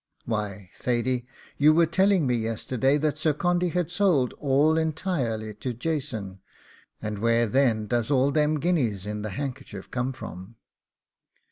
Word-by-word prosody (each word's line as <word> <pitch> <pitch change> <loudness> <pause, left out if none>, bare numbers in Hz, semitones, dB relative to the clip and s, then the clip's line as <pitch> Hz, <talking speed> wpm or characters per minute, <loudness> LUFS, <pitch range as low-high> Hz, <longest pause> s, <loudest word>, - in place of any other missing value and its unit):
'Why, 105 -4 -4
Thady, 125 0 0 0.3
you 150 +2 +6
were 165 +1 +5
telling 190 0 +3
me 125 - +1
yesterday 120 +4 0
that 150 0 -1
Sir 155 -1 +2
Condy 175 +2 +1
had 175 0 -1
sold 175 -10 +2
all 145 +3 +3
entirely 150 - -1
to 120 +4 -4
Jason, 120 -9 -3 0.6
and 105 -1 -3
where 115 +1 +3
then 115 -2 +2
does 120 0 -1
all 140 0 +3
them 150 0 +2
guineas 125 - 0
in 105 0 -4
the 110 - -4
handkerchief 105 -4 -6
come 125 +1 -1
from? 110 -4 -9
130 Hz, 145 wpm, -26 LUFS, 110-155 Hz, 0.6 s, you